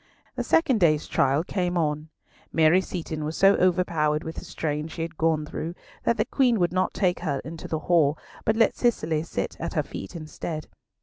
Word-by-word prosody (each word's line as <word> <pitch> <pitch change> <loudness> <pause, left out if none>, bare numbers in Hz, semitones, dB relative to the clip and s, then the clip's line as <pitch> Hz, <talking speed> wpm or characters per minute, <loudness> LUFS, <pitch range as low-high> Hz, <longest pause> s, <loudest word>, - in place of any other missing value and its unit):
The - - -1
second 270 -8 +3
day's 155 -4 +3
trial 135 +4 +2
came 180 -1 -1
on. 155 -1 -1 0.4
Mary 165 +3 +5
Seaton 160 -4 -5
was 155 +2 -3
so 195 +1 +6
overpowered 165 -4 +2
with 160 - -6
the - - -6
strain 150 0 -3
she 165 0 -5
had 165 0 -6
gone 160 -1 +1
through 165 +3 -5 0.3
that 235 - +2
the 215 - +2
Queen 245 -2 +2
would 175 -1 +1
not 185 0 0
take 180 -3 +1
her 150 -5 -1
into 165 +1 -7
the 160 - -1
hall, 160 -4 +3 0.3
but 220 - +2
let 225 0 +3
Cicely 160 -10 +1
sit 165 - -4
at - - -4
her - - +2
feet 95 - -8
instead. 155 0 -5
165 Hz, 195 wpm, -26 LUFS, 155-185 Hz, 0.4 s, so